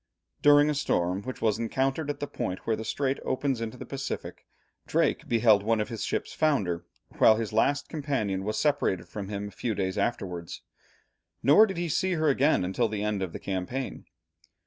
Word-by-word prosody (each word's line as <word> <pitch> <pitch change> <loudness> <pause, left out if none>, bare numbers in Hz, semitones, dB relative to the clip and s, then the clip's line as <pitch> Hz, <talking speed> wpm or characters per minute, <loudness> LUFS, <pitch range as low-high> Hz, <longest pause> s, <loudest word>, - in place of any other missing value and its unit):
During 145 0 +6
a 150 - +2
storm 95 -10 0
which 130 +2 -7
was 110 -1 +2
encountered 135 +6 -1
at 145 0 -3
the 145 - -2
point 95 -9 -4
where 115 - +1
the 110 - -6
strait 135 +4 -1
opens 130 -2 -1
into 115 +2 -4
the - - -8
Pacific, 135 -1 -6 0.4
Drake - - +1
beheld 110 -3 +5
one 110 +2 +1
of 105 - -2
his 115 -3 -4
ships - - -2
founder, 105 - +1 0.4
while 110 - +7
his 110 -1 -3
last 140 +6 +2
companion 130 -11 -2
was 110 +2 -2
separated 140 -11 +1
from 100 -2 -6
him 100 0 -4
a - - -14
few 110 +3 -3
days 95 -1 -1
afterwards, 90 -7 -3 0.8
nor 205 +11 +7
did 190 -3 -5
he 175 0 -1
see 185 +4 0
her 155 -2 +2
again 140 -6 +3
until 105 +6 +1
the 105 -1 -3
end 105 -2 -1
of 95 -3 -2
the - - -7
campaign. 100 +8 -4
115 Hz, 190 wpm, -28 LUFS, 100-140 Hz, 0.8 s, while